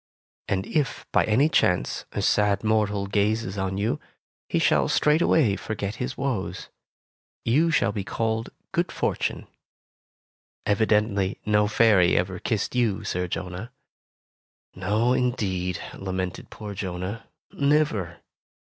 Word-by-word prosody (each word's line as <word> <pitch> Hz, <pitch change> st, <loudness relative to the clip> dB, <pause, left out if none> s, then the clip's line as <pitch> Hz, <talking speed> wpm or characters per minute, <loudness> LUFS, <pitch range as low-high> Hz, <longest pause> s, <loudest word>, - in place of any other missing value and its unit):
And 95 Hz, 0 st, 0 dB
if, 150 Hz, -4 st, -1 dB
by -, -, +3 dB
any 120 Hz, +8 st, +4 dB
chance, 90 Hz, -, +1 dB
a -, -, -2 dB
sad 105 Hz, 0 st, +2 dB
mortal 105 Hz, -2 st, +1 dB
gazes 105 Hz, 0 st, 0 dB
on 95 Hz, 0 st, -1 dB
you, 105 Hz, +3 st, 0 dB, 0.5 s
he -, -, +1 dB
shall -, -, +3 dB
straightway 150 Hz, -7 st, +3 dB
forget 105 Hz, -1 st, -4 dB
his 130 Hz, +1 st, -4 dB
woes. 105 Hz, -9 st, -3 dB, 0.8 s
You 150 Hz, +9 st, +3 dB
shall 155 Hz, -8 st, +2 dB
be 100 Hz, -1 st, -3 dB
called 110 Hz, +2 st, -2 dB, 0.2 s
Good -, -, 0 dB
Fortune.' -, -, -2 dB, 1.2 s
Evi 105 Hz, +2 st, +2 dB
dently, 105 Hz, -2 st, +1 dB
no 105 Hz, 0 st, +3 dB
fairy 105 Hz, -5 st, +4 dB
ever 90 Hz, +1 st, -1 dB
kissed 110 Hz, -4 st, -1 dB
you. 120 Hz, -5 st, +1 dB
Sir 90 Hz, 0 st, -2 dB
Jonah." 90 Hz, +5 st, -5 dB, 1.0 s
"No, 105 Hz, +6 st, +1 dB
indeed," 95 Hz, -9 st, 0 dB, 0.2 s
lamented 95 Hz, -2 st, -4 dB
poor 105 Hz, -1 st, -7 dB
Jonah, 95 Hz, +2 st, -5 dB, 0.3 s
"never!" 140 Hz, -, +1 dB
105 Hz, 120 wpm, -25 LUFS, 95-115 Hz, 1.2 s, any